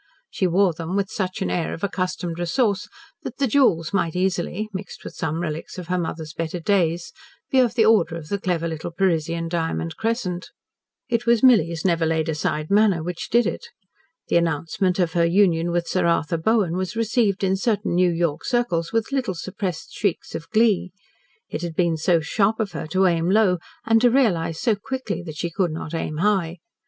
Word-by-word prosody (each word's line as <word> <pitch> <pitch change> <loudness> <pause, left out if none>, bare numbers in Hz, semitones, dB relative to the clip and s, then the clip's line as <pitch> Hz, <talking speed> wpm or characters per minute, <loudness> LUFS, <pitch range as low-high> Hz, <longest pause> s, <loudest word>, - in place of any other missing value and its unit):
She 185 - 0
wore 180 +1 +3
them 165 +3 -5
with 200 -1 -1
such 185 -1 -2
an - - -2
air 170 -2 -1
of 165 - -13
accustomed 185 -3 -2
resource 190 +3 0 0.3
that 255 - -7
the 280 - +2
jewels 210 - +2
might 170 -4 0
easily 185 +2 -1
mixed 190 +1 -7
with - - -8
some 160 0 -2
relics 155 +1 -5
of 180 -1 -7
her 180 0 +1
mother's 160 -2 -4
better 165 +2 -3
days 170 -2 0 0.4
be 265 - +4
of 240 -2 +3
the 225 -3 +4
order 205 -7 +4
of 160 -2 -8
the 200 - -1
clever 170 -3 -1
little 160 0 -4
Parisian 170 -2 0
diamond 165 -1 -2
crescent. 220 -6 -2 0.6
It 240 -1 -1
was 235 0 +4
Milly's 170 -10 +4
never 165 -3 +2
laid 160 0 0
aside 155 0 -2
manner 200 -5 +4
which 175 0 -5
did 235 +1 +4
it. - - -3 0.6
The - - +3
announcement 170 +3 0
of 175 -3 +1
her 170 - +3
union 170 -1 +3
with 175 0 -1
Sir 185 -2 +1
Arthur 165 -1 +1
Bowen 190 -1 +1
was 185 +2 -3
received 225 -3 +1
in 190 0 +2
certain 205 -1 0
New 180 +1 +4
York 165 -2 -1
circles 180 -10 0
with 225 +3 -1
little 250 -9 -1
suppressed 185 -1 -5
shrieks 200 -5 -2
of 165 - -6
glee. 215 -4 +3 0.6
It - - -5
had 170 -2 -4
been 170 -2 +2
so 165 +1 +2
sharp 200 +7 +1
of 210 -3 -1
her 155 - -5
to 185 +4 +2
aim 170 -1 +2
low 195 -3 +3 0.3
and 225 0 +4
to 245 - +6
realise 185 -11 +1
so 230 - +2
quickly 240 0 -4
that 155 -1 -7
she 170 +1 -3
could 180 +1 0
not 155 0 -6
aim 155 -2 -3
high. 185 -2 +1
180 Hz, 195 wpm, -23 LUFS, 165-205 Hz, 0.6 s, to